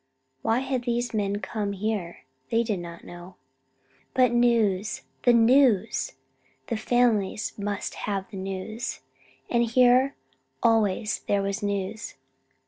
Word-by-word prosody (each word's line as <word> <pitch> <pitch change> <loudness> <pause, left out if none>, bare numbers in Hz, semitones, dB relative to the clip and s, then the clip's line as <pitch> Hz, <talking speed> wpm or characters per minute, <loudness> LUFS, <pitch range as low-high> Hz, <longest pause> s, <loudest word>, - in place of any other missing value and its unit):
Why 225 +3 +1
had 260 -2 -2
these 240 -1 -1
men 200 -2 0
come 205 +1 -3
here? 200 -3 -3 0.3
They 230 +1 +2
did 215 -5 -2
not 170 -1 -9
know. 175 +1 -11 0.8
But 255 -2 +4
news 225 -5 +2 0.2
the 245 - +7
news! 235 -2 +4 0.6
The - - 0
families 220 -3 +1
must 205 -1 -3 0.2
have 195 -1 -2
the 200 - -7
news. 195 +4 -5 0.5
And 235 -1 +2
here 250 +3 +4 0.5
always 215 -1 +2
there 200 -1 +2
was 200 +2 -2
news! 205 +1 -3
215 Hz, 125 wpm, -26 LUFS, 195-240 Hz, 0.8 s, the